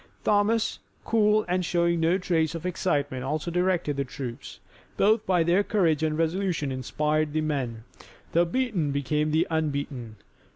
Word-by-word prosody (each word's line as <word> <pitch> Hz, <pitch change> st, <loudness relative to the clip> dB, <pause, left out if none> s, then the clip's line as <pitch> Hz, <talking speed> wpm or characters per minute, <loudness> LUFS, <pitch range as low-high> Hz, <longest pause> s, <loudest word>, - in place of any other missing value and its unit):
Thomas, 215 Hz, +2 st, +2 dB, 0.3 s
cool, 215 Hz, -1 st, +3 dB
and 180 Hz, +1 st, 0 dB
showing 170 Hz, 0 st, +1 dB
no 165 Hz, +3 st, +3 dB
trace 170 Hz, -4 st, 0 dB
of 165 Hz, -, -6 dB
excitement 145 Hz, -7 st, -1 dB
also 155 Hz, +5 st, -2 dB
directed 180 Hz, -4 st, 0 dB
the 140 Hz, -, +1 dB
troops. 125 Hz, -2 st, -7 dB, 0.4 s
Both 215 Hz, +2 st, +3 dB
by 180 Hz, -3 st, +3 dB
their 175 Hz, +4 st, +3 dB
courage 170 Hz, -9 st, +1 dB
and 155 Hz, -1 st, 0 dB
resolution 165 Hz, -3 st, 0 dB
inspired 150 Hz, +4 st, -1 dB
the 155 Hz, -, +1 dB
men. 130 Hz, -7 st, -2 dB, 0.5 s
The 170 Hz, +1 st, +3 dB
beaten 200 Hz, -, 0 dB
became 150 Hz, +2 st, 0 dB
the 155 Hz, +2 st, +2 dB
unbeaten. 140 Hz, -7 st, -2 dB
160 Hz, 150 wpm, -26 LUFS, 145-180 Hz, 0.5 s, cool